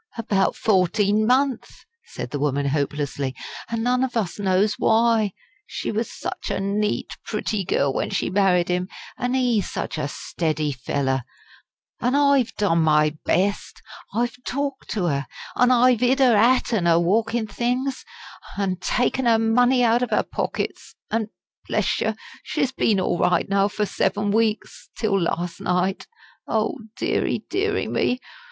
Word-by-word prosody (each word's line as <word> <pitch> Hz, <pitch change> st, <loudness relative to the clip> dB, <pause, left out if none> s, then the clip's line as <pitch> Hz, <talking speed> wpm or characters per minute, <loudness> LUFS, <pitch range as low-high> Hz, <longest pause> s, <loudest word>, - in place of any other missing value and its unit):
"About 200 Hz, -4 st, +1 dB
fourteen 205 Hz, +2 st, +2 dB
month," 260 Hz, 0 st, 0 dB, 0.2 s
said -, -, -7 dB
the 145 Hz, -, -3 dB
woman, 140 Hz, -1 st, 0 dB
hopelessly. 140 Hz, -2 st, -2 dB, 0.3 s
"An' 230 Hz, -1 st, -2 dB
none 250 Hz, +1 st, +2 dB
of 250 Hz, -2 st, -2 dB
us 205 Hz, -3 st, -2 dB
knows 200 Hz, +2 st, +2 dB
why. 225 Hz, -2 st, +3 dB, 0.4 s
She -, -, -4 dB
was 220 Hz, +1 st, -2 dB
such -, -, -5 dB
a -, -, -1 dB
neat, 205 Hz, +2 st, -1 dB
pretty 215 Hz, -1 st, -2 dB
girl 140 Hz, -5 st, +1 dB
when -, -, -1 dB
she -, -, -1 dB
married 185 Hz, -3 st, +2 dB
'im 180 Hz, +1 st, 0 dB, 0.3 s
an' 250 Hz, +1 st, -1 dB
ee 245 Hz, -5 st, +2 dB
such 165 Hz, -, -4 dB
a 145 Hz, -, -1 dB
steady 155 Hz, 0 st, -2 dB
fellow. 130 Hz, 0 st, -1 dB, 0.8 s
An' 250 Hz, +3 st, +1 dB
I've 280 Hz, -4 st, +3 dB
done 195 Hz, -5 st, +2 dB
my 150 Hz, -1 st, +3 dB
best. 200 Hz, +4 st, 0 dB, 0.3 s
I've 240 Hz, +3 st, -1 dB
talked 280 Hz, 0 st, -3 dB
to 200 Hz, -5 st, -1 dB
'er, 140 Hz, -4 st, -1 dB, 0.3 s
an' 250 Hz, -, +4 dB
I've 250 Hz, -1 st, +4 dB
'id 255 Hz, +2 st, +3 dB
'er 250 Hz, -4 st, +5 dB
'at 240 Hz, +4 st, +3 dB
an' 185 Hz, -6 st, +1 dB
her 170 Hz, 0 st, +5 dB
walking 220 Hz, +6 st, +1 dB
things, 250 Hz, -, -2 dB, 0.5 s
an' 195 Hz, -2 st, -1 dB
taken 245 Hz, +6 st, 0 dB
'er 230 Hz, -1 st, +5 dB
money 245 Hz, +3 st, +3 dB
out 235 Hz, +1 st, +3 dB
of 250 Hz, -, -2 dB
'er -, -, +2 dB
pockets. -, -, -4 dB, 0.2 s
An', 220 Hz, -1 st, -1 dB, 0.4 s
bless -, -, 0 dB
yer, -, -, 0 dB, 0.3 s
she's 265 Hz, -, -1 dB
been 215 Hz, -6 st, +1 dB
all 175 Hz, -2 st, 0 dB
right 180 Hz, -1 st, +2 dB
now 195 Hz, 0 st, +2 dB
for 210 Hz, +1 st, -2 dB
seven 205 Hz, +1 st, 0 dB
weeks 220 Hz, 0 st, -1 dB
till 195 Hz, -3 st, +1 dB
last 170 Hz, +1 st, -2 dB
night. 180 Hz, +1 st, 0 dB, 0.4 s
Oh, 340 Hz, -, 0 dB, 0.2 s
deary, -, -, -1 dB
deary, 410 Hz, +2 st, 0 dB
me! 250 Hz, -, 0 dB
210 Hz, 155 wpm, -23 LUFS, 180-245 Hz, 0.8 s, er